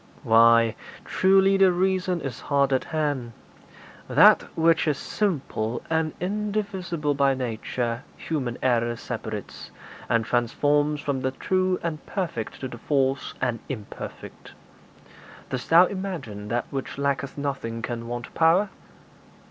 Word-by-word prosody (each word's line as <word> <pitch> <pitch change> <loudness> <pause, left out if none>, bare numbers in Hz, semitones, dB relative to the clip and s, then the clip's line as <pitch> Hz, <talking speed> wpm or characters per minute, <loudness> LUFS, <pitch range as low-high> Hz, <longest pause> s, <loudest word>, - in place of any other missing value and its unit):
'Why, 115 0 +5 0.3
truly 195 +1 +4
the 190 -1 +6
reason 185 -1 0
is 130 -3 -5
hard 140 -1 +2
at 130 - +1
hand. 145 -7 -2 0.8
That - - +7 0.2
which 165 0 +3
is 150 -2 +1
simple 140 - -2
and 160 -1 +1
indivisible 190 -5 -2
by 140 -1 +2
nature 120 -1 -3 0.2
human 130 -7 -3
error 120 -2 +2
separates, - - -6 0.4
and 115 -1 +2
transforms 145 +5 +1
from 140 -2 -2
the 130 - 0
true 185 +6 0
and 160 -2 -3
perfect 165 - -4
to 130 - -3
the 120 -2 -9
false 135 0 0
and 120 -3 0
imperfect. 110 -6 -8 1.0
Dost 130 -2 -4
thou 170 +3 +8
imagine 170 - -5
that 120 +2 -1
which 135 -1 -4
lacketh 140 -1 -1
nothing 130 -5 -3
can 115 0 -4
want 120 0 -6
power?' 170 +5 +4
140 Hz, 125 wpm, -25 LUFS, 120-170 Hz, 1.0 s, thou